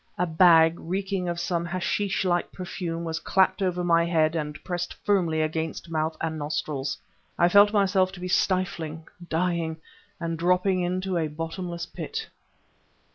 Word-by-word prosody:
A 180 - +1
bag, 165 -1 +5
reeking 190 +1 -2
of 170 0 -2
some 170 -1 -1
hashish 185 +3 -1
like 175 -1 0
perfume, 175 -2 -5
was 165 0 -3
clapped 190 +2 +2
over 180 -2 0
my 170 -1 +4
head 165 -1 +2
and 150 -2 -3
pressed 175 -1 -3
firmly 170 -6 +2
against 160 +1 -3
mouth 160 0 -1
and 160 -1 -2
nostrils. 145 -2 -2 0.4
I 175 - +5
felt 205 +2 +7
myself 195 -2 +2
to 185 - -9
be 180 - -4
stifling 175 -4 0 0.3
dying 165 -1 0 0.4
and 165 -1 -3
dropping 180 +2 +2
into 185 0 -1
a 160 - 0
bottomless 170 +3 -5
pit. 450 - -6
175 Hz, 150 wpm, -26 LUFS, 160-185 Hz, 0.4 s, felt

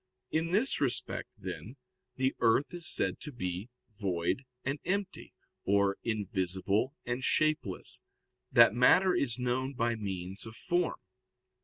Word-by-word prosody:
In 160 +1 0
this 215 +9 +3
respect, 135 -4 0
then, 120 +6 -7 0.4
the 130 +1 +1
earth 120 +8 +3
is 175 -2 -4
said - - 0
to 150 - -6
be 95 -3 -4 0.2
"void 100 +4 -1 0.2
and 135 +3 -1
empty," 200 0 -2 0.3
or 100 0 +2
"invisible 100 - -1
and 125 +2 -2
shapeless," 155 -13 0 0.5
that - - +7
matter 180 +10 +5
is 135 -10 0
known 130 +2 -1
by 120 0 +1
means 95 -2 -5
of 110 - -10
form. 175 +6 0
120 Hz, 130 wpm, -31 LUFS, 100-150 Hz, 0.5 s, that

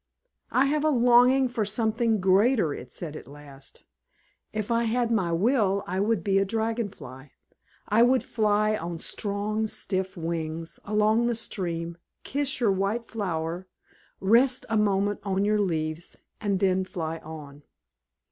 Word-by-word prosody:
"I 260 - +3
have 295 +2 0
a 310 - +3
longing 250 0 +5
for 240 -3 -2
something 220 +1 0
greater," 195 - +3
it 125 -2 -9
said 155 0 -6
at - - -9
last. 140 -1 -12 0.7
"If 215 +1 -3
I 235 0 +2
had 235 +1 0
my 190 -7 +1
will, 200 +1 +2
I 185 +2 -3
would 205 -3 +1
be 195 -1 +2
a - - +3
Dragon 225 +2 -1
Fly. 135 -5 -12 0.5
I 215 +3 +3
would 255 +2 +4
fly 215 -1 +1
on 170 -3 -5
strong, 210 +4 -2
stiff 190 -3 -2
wings 165 -1 -4
along 215 +3 +2
the 240 - 0
stream, 170 -6 -4 0.2
kiss 280 0 -1
your 230 -5 +3
white 200 +5 -1
flower, 175 -3 -3 0.5
rest 245 +6 +3
a 225 - 0
moment 205 -1 +1
on 195 0 0
your 210 0 +2
leaves, 160 -3 -2 0.2
and 200 -3 0
then 190 -1 +2
fly 165 -3 -5
on." 150 -3 -10
205 Hz, 150 wpm, -26 LUFS, 170-230 Hz, 0.7 s, longing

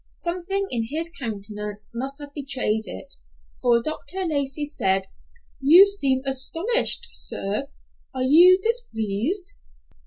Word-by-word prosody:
Something 365 +3 -3
in 230 -2 -1
his 325 +4 -1
countenance 210 -5 -7
must 265 +4 -5
have 290 -1 -11
betrayed 260 -6 -2
it, 95 - -6 0.5
for 235 -1 +2
Dr. 365 +5 -3
Lacey 285 -2 -1
said, 195 -10 +1 0.6
"You 320 +8 +7
seem 275 -10 +1
astonished, 330 - +2
sir. 210 +8 -2 0.4
Are 260 -1 -3
you 345 +8 +6
displeased?" 355 - -2
275 Hz, 115 wpm, -23 LUFS, 230-345 Hz, 0.6 s, You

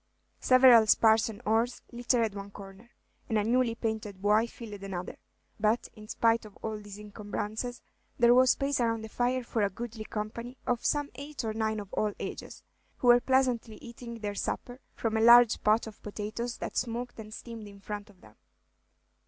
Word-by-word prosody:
Several 255 -3 +7
spars 220 +1 +4
and 215 - -10
oars 225 +3 +1
littered 235 -2 0
one 200 0 -7
corner, 200 +3 -12 0.4
and 220 - +1
a 210 - +2
newly 235 +1 +2
painted 220 -4 -4
buoy 210 +3 +3
filled 215 -4 -10
another; 190 -2 -6 0.4
but, 215 +3 +1
in 215 -2 -13
spite 230 +1 +2
of 210 -2 -13
all 215 -1 -3
these 205 -1 -10
encumbrances, 210 +3 -5 0.3
there 240 0 +6
was 255 +1 +5
space 275 +1 +1
around 230 -2 0
the 220 - -7
fire 245 +2 0
for 235 -1 -2
a 200 - +2
goodly 225 +2 -7
company 230 +4 -6
of 245 -1 -1
some 290 -1 0
eight 285 +2 -7
or 220 -1 -2
nine 220 0 -1
of 200 -2 -10
all 210 -1 0
ages, - - -7 0.3
who 245 - +2
were 240 0 +7
pleasantly 250 -4 +1
eating 235 0 -9
their 205 -1 -3
supper 245 +5 -4 0.2
from 225 -1 -2
a 220 - +2
large 235 0 +7
pot 215 +2 +3
of 220 -2 -11
potatoes 215 +3 -5
that - - -6
smoked 245 0 -3
and 215 -1 -9
steamed 225 -1 -8
in 200 -1 -13
front 205 +1 -7
of 190 -3 -21
them. - - -18
225 Hz, 185 wpm, -29 LUFS, 210-240 Hz, 0.4 s, Several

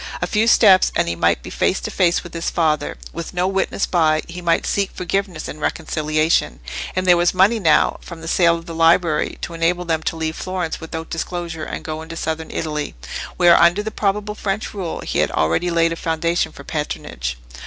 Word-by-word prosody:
A - - 0
few 220 +1 +1
steps, 195 -5 +6
and - - +2
he 85 - -1
might 85 0 +1
be - - -8
face - - +1
to - - -4
face 175 -2 +2
with 175 - -11
his 165 0 -2
father, 155 -3 0 0.2
with 170 +2 -6
no 180 +1 +1
witness 195 +1 0
by; 155 -3 +2
he 175 +1 -7
might 170 -1 +1
seek 200 -1 0
forgiveness 185 -2 -3
and 155 - -8
reconciliation; 155 0 0 0.4
and 185 0 0
there 180 -1 +6
was 175 +1 +2
money 200 +5 +4
now, 160 -6 +3
from 170 -2 -10
the 165 - -8
sale 170 0 +4
of 165 - -11
the 170 - -7
library, 165 -1 +2
to 170 - -5
enable 170 +2 0
them 160 -2 0
to 160 - -2
leave 160 0 -3
Florence 185 -3 -3
without 160 0 -6
disclosure, 165 -1 -4
and - - -6
go 155 0 -4
into 160 +1 -8
Southern 160 0 -3
Italy, 150 -2 -3 0.4
where 175 -1 +6
under 175 +4 +4
the 220 - -4
probable 210 0 -1
French 210 0 -3
rule, 185 -5 -4
he - - -2
had - - +2
already 80 - +1
laid 165 -1 +2
a - - -4
foundation 165 +1 -1
for - - -12
patronage. 65 - -4
170 Hz, 205 wpm, -20 LUFS, 160-185 Hz, 0.4 s, steps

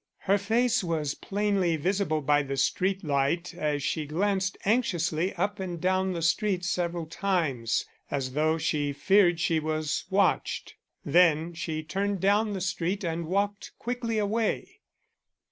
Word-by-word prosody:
Her 200 +2 +2
face 225 +2 +2
was 155 -4 -1
plainly 200 -4 0
visible 170 -1 0
by 145 +1 +3
the 135 -1 -4
street 190 +8 +1
light 150 +4 0
as 150 -4 -1
she 155 0 -1
glanced 190 +4 0
anxiously 185 -6 +1
up 200 +3 -1
and 180 -3 -4
down 185 +1 +1
the 170 -2 -3
street 180 +2 +1
several 175 -1 -1
times, 155 - -1 0.2
as 135 -2 -2
though 155 +2 +2
she 150 -2 -1
feared 175 +3 +3
she 165 -1 +2
was 155 -1 -2
watched. 195 -1 +1 0.3
Then 165 +1 +4
she 160 -1 -4
turned 195 +4 -2
down 205 +3 +2
the 190 - -4
street 185 +2 -1
and 165 -1 -2
walked 200 +3 -1
quickly 235 -2 -2
away. 215 +2 -1
175 Hz, 145 wpm, -28 LUFS, 155-200 Hz, 0.3 s, Then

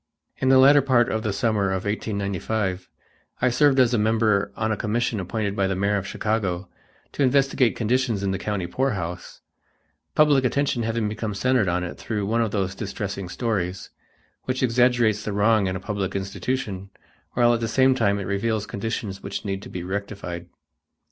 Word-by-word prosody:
In 130 - +1
the 135 - +7
latter 140 +2 +7
part 130 -3 +3
of 110 - -1
the 110 -2 -1
summer 105 0 +1
of 95 0 -2
1895, 100 -2 -2 0.5
I 130 - +3
served 135 +2 +4
as 125 -1 +4
a 120 - +2
member 110 -2 +2
on 110 0 -1
a - - +1
commission 115 +1 -1
appointed 100 +2 -2
by 100 -1 +1
the 95 - -1
mayor 100 +2 +1
of 100 0 -4
Chicago, 100 -4 -2 0.4
to - - -4
investigate 135 -2 +3
conditions 120 -2 0
in 100 - 0
the 95 - -2
county 105 -3 -2
poorhouse, 90 -5 -3 0.7
public 145 -3 +5
attention 130 -1 +1
having 115 -1 -1
become 110 -1 -4
centered 125 -2 +2
on 90 +1 0
it 90 - -6
through 105 -3 -3
one 115 +3 +1
of 115 - +1
those 95 -2 -1
distressing 100 -2 -5
stories, 95 -4 -2 0.5
which 130 0 -1
exaggerates 120 -3 +3
the 105 - -3
wrong 105 0 +3
in 95 - -2
a - - -3
public 100 -1 -3
institution 100 0 -3 0.4
while 120 -1 +4
at 115 - 0
the 115 - -1
same 130 +3 +4
time 105 -6 +1
it 100 - -3
reveals 105 +2 -1
conditions 105 -2 -4
which 100 - -5
need 95 -1 -3
to - - -10
be 90 - -5
rectified. 95 -2 -5
105 Hz, 180 wpm, -24 LUFS, 100-120 Hz, 0.7 s, the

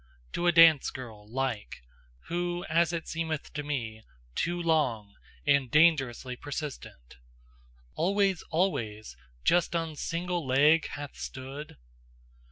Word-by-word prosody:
To 175 - 0
a - - +6
dance 165 -4 +7
girl 110 -5 -10
like, 125 - -3 0.4
who 175 +1 -3
as 170 0 +2
it 170 -2 -4
seem'th 160 -2 -3
to 150 - -3
me, 120 -7 -4 0.3
Too 175 - -1
long, 130 -12 0 0.3
and 140 -3 +3
dangerously 135 -5 +3
persistent, 140 - -7 0.8
Always, 195 +1 +1
always, 110 - -1 0.3
just 175 0 +3
on 165 -2 -2
SINGLE 175 +2 -2
leg 150 +5 +4
hath 145 -1 -7
stood? 135 +3 -7
150 Hz, 115 wpm, -29 LUFS, 130-170 Hz, 0.8 s, dance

